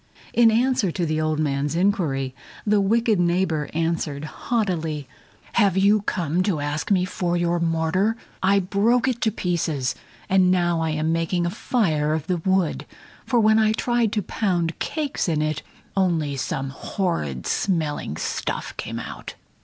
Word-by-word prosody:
In 235 -1 +6
answer 235 -2 +2
to 175 0 -1
the 155 0 0
old 155 0 0
man's 145 0 0
inquiry, 160 -9 +1 0.3
the 210 -1 +3
wicked 220 0 +2
neighbor 170 -3 +1
answered 160 -3 -1
haughtily: 165 - -2 0.5
"Have 200 -4 +3
you 200 +2 +4
come 175 -4 -1
to 185 -5 0
ask 145 +1 -3
me 185 -3 +3
for 175 -1 -1
your 175 0 +1
mortar? 170 +6 +1 0.2
I 195 +1 +4
broke 215 +7 +2
it 245 -2 -1
to 220 - +2
pieces, 160 - -1 0.3
and 185 -1 +4
now 175 -2 +2
I 160 - 0
am 155 +1 0
making 170 +1 0
a 175 - -1
fire 155 -9 +1
of 160 -2 -3
the 180 +1 0
wood, 190 0 0 0.4
for 245 - +3
when 220 0 +5
I 215 0 +3
tried 240 -1 +1
to 210 - 0
pound 175 -5 -1
cakes 295 - -2
in 155 -2 +1
it 155 -1 -1 0.3
only 165 -7 +1
some 135 0 -3
horrid 135 - -3
smelling 155 - -1
stuff - - -3
came - - -4
out." - - -7
175 Hz, 160 wpm, -23 LUFS, 155-200 Hz, 0.5 s, In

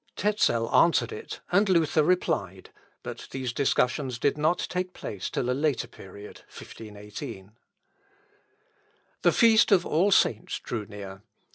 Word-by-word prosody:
Tezel 175 - +1
answered 170 - +4
it, 440 +1 -8
and 200 +3 +3
Luther 165 -3 +3
replied; 100 - -1 0.3
but - - -7
these 130 -3 -4
discussions 130 -1 0
did 140 +4 +1
not 155 +4 +1
take 180 0 -3
place 100 -3 -5
till 125 - -2
a - - +1
later 140 -2 0
period, 100 +2 -12
(1518). 105 -2 -10 1.7
The - - +4
feast 225 -1 +5
of 185 -3 +4
All 175 +6 +2
Saints 115 - +2
drew 110 -4 -5
near. 100 -2 -9
135 Hz, 130 wpm, -27 LUFS, -, 1.7 s, feast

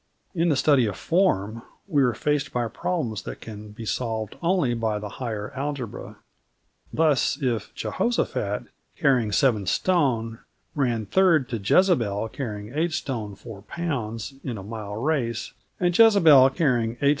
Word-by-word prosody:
In 170 -1 +1
the 150 - +3
study 135 -4 +3
of 100 - -3
form 115 - +1 0.3
we 150 -7 +2
are 125 -4 +2
faced 150 +3 -1
by 120 -1 -1
problems 115 - -3
that - - -8
can 105 -1 -9
be 110 +2 -9
solved 110 -2 -3
only 170 -8 +2
by 110 -2 -1
the 105 0 -6
higher 110 -1 -4
algebra. 135 -4 -5 0.8
Thus, 150 -4 +2
if 120 -7 -2
Jehoshaphat, 110 - -1 0.3
carrying 125 -6 +2
7 110 -5 +2
st., 120 - +1 0.4
ran 120 -6 0
third 165 - +3
to 120 - -2
Jezebel, 110 - +2
carrying 110 -3 -6
8 165 +3 0
st. 115 - -4
4 100 -1 -10
lb., 135 - -4
in 120 -4 -4
a 95 - -8
mile 105 -1 -6
race, 120 -3 -1 0.3
and 175 -1 +1
Jezebel, 165 - +7
carrying 125 -6 +1
8 120 - -19
st. 140 - +3
120 Hz, 150 wpm, -25 LUFS, 110-150 Hz, 0.8 s, Jezebel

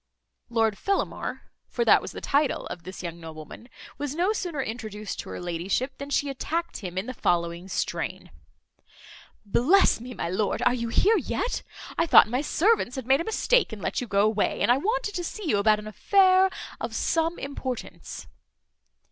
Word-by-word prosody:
Lord 225 -3 +1
Fellamar 395 0 -2 0.3
(for 475 - -1
that - - +6
was - - -7
the - - -8
title 285 0 +1
of 175 - -6
this 185 0 -8
young 170 -1 -5
nobleman) 160 - -10 0.3
was 290 0 -3
no 365 +6 +2
sooner 350 -8 -3
introduced 215 -4 -5
to - - -6
her - - -6
ladyship, 180 +10 -2
than 280 - -6
she 285 0 +1
attacked 325 +5 -3
him 185 -3 -7
in 190 - -1
the 255 - -5
following 170 -3 -1
strain: 185 - -3 1.1
"Bless 270 - +4
me, 245 +1 -8
my - - -3
lord, 190 +4 -1
are 245 - +4
you 235 -2 -2
here 420 - +4
yet? - - -2 0.4
I 335 - +3
thought - - +8
my 250 +4 0
servants 345 - +2
had 265 -3 -5
made 270 +4 +4
a - - -4
mistake, 480 +1 +2
and 220 - -7
let - - -2
you 250 - -4
go 200 -2 +2
away; 215 -1 0
and - - +4
I 245 - +5
wanted 435 - -1
to 355 - -3
see 390 +2 -5
you 205 -8 +2
about 215 +1 +4
an 210 - -8
affair 375 - +4 0.3
of - - -4
some 330 +1 0
importance." 265 -3 -6
250 Hz, 185 wpm, -26 LUFS, 205-335 Hz, 1.1 s, thought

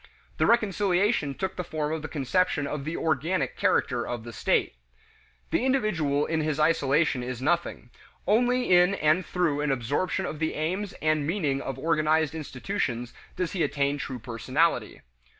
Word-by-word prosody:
The - - +2
reconciliation 200 - +2
took 190 -1 -4
the 180 - -2
form 155 -2 -3
of 160 - -3
the 155 - -5
conception 145 +2 0
of 140 -1 -4
the 160 +2 -3
"organic" 160 +4 0
character - - +1
of 120 -2 -4
the 120 0 -9
state. - - +1 0.8
The - - +1
individual 175 - +1
in 160 -1 0
his 155 -1 -1
isolation 150 -3 +2
is 125 -1 -5
nothing; 160 -3 -1 0.3
only 245 +3 +2
in 180 +3 +5
and 155 +1 +2
through 165 -5 0
an 150 - 0
absorption 135 +8 -1
of 150 - -5
the 160 0 -1
aims 185 +6 -2
and 155 -2 +1
meaning 150 -7 0
of 135 -2 -5
organized 155 +1 +1
institutions 130 - -3 0.2
does 180 -2 -2
he 190 - -2
attain 140 -1 0
true 130 -2 -4
personality. 130 +8 -1
155 Hz, 160 wpm, -27 LUFS, 140-180 Hz, 0.8 s, in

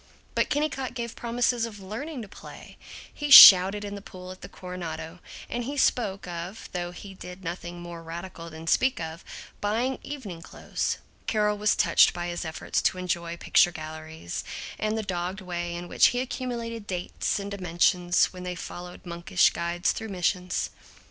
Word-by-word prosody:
But - - +1
Kennicott 270 -4 -1
gave 235 -2 -4
promise 240 +1 +1
of 230 -3 -3
learning 235 +8 -6
to - - -9
play. - - -12 0.4
He 295 -1 -4
shouted 195 -4 +11
in 205 - -5
the 200 - -7
pool 185 -2 -10
at 185 - -12
the 180 - -9
Coronado, 180 -2 -7 0.3
and 240 0 -3
he 285 +3 -4
spoke 200 -8 +1
of 175 +4 -6
(though 175 -1 -3
he 195 +2 -10
did 180 0 -10
nothing 175 0 -6
more 175 -1 -8
radical 170 +1 -8
than 160 0 -10
speak 260 +10 +2
of) 160 +1 -6 0.4
buying 235 +6 0
evening 215 -13 -7
clothes. - - -3 0.3
Carol 210 -1 +2
was 210 0 +3
touched - - +5
by 175 0 -3
his 175 0 -4
efforts 160 0 -2
to - - +1
enjoy 170 -2 -3
picture 175 - +4
galleries, 155 - -7 0.4
and 215 +1 0
the 220 - -2
dogged 185 0 -3
way 175 -2 -4
in 175 0 -6
which - - +5
he 245 - 0
accumulated 235 -4 -4
dates 180 -2 -2
and 200 0 -5
dimensions 180 -1 +2
when 180 - -9
they 180 0 -4
followed 175 +1 -8
monkish 175 +1 +2
guides 170 +1 0
through 220 0 -5
missions. 180 -1 -1
185 Hz, 170 wpm, -27 LUFS, 175-220 Hz, 0.4 s, shouted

